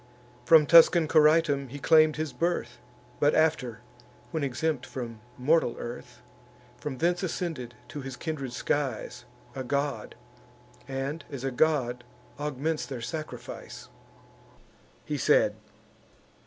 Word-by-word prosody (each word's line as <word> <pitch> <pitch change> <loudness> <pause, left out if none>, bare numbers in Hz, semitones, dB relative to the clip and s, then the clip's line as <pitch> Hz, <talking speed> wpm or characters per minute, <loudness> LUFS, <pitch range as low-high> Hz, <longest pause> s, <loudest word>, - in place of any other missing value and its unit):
From 160 -2 +7
Tuscan 165 0 +7
Coritum 155 -2 +4
he 135 +4 -8
claim'd 155 +1 +5
his 155 -1 -3
birth; 145 -8 -2 0.4
But 145 +1 +3
after, 150 -8 +1 0.5
when 160 -3 -2
exempt 140 +1 -1
from 120 -4 -7 0.2
mortal 140 0 +2
earth, 120 +1 -8 0.6
From 140 -3 -5
thence 175 +4 +1
ascended 160 -9 -4
to 145 - -6
his 135 -1 -7
kindred 140 -4 -4
skies, 130 -2 -2 0.3
A 130 - -4
god, 140 +2 -2 0.7
and, 135 +4 -4
as 140 -4 -7
a 135 - -1
god, 125 -3 +1 0.4
augments 150 +2 -2
their 130 -4 -6
sacrifice." 155 +5 -7 1.2
He - - -3
said. - - +3
145 Hz, 115 wpm, -28 LUFS, 130-160 Hz, 1.2 s, From